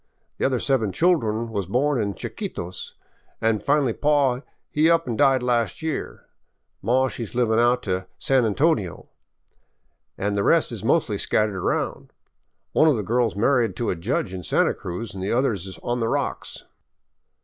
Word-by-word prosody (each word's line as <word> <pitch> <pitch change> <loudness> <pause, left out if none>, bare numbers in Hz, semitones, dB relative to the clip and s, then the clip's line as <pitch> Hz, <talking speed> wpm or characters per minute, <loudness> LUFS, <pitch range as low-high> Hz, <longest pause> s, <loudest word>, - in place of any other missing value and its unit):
The - - +1
other 130 -2 0
seven 115 -7 +1
children 115 - +1
was 100 -5 -2
born 130 +4 +1
in 100 -2 -2
Chiquitos, 90 +1 -6 0.4
an' 115 -1 +1
finally 140 -3 +2
paw 140 -3 +2 0.3
he 155 +2 +3
up 165 -3 +3
an' 120 - -1
died 135 -1 +3
last 120 - 0
year. 160 -2 -4 0.6
Maw 130 +3 +2
she 120 - -5
's 115 - -9
livin' 115 -2 +2
out 120 +1 +3
to 95 -1 -2
San 135 -2 +2
Antonio, 110 - 0 1.1
an' 100 +1 -1
the 100 - 0
rest 165 +8 +3
is 110 -4 -6
mostly 115 -5 +1
scattered 105 -2 +1
around. 95 - -2 0.6
One 155 - +4
of 150 - +4
the 105 - -2
girl 120 +4 +1
's - - -13
married 115 -1 +2
to 120 - -1
a - - -1
judge 95 +2 -2
in 95 - -5
Santa - - +2
Cruz 90 +6 -6
an' 95 - -7
the 95 - -2
others 115 -7 0
is 95 -3 -8
on 120 0 -1
the 115 - 0
rocks." - - -3
115 Hz, 175 wpm, -24 LUFS, 100-135 Hz, 1.1 s, One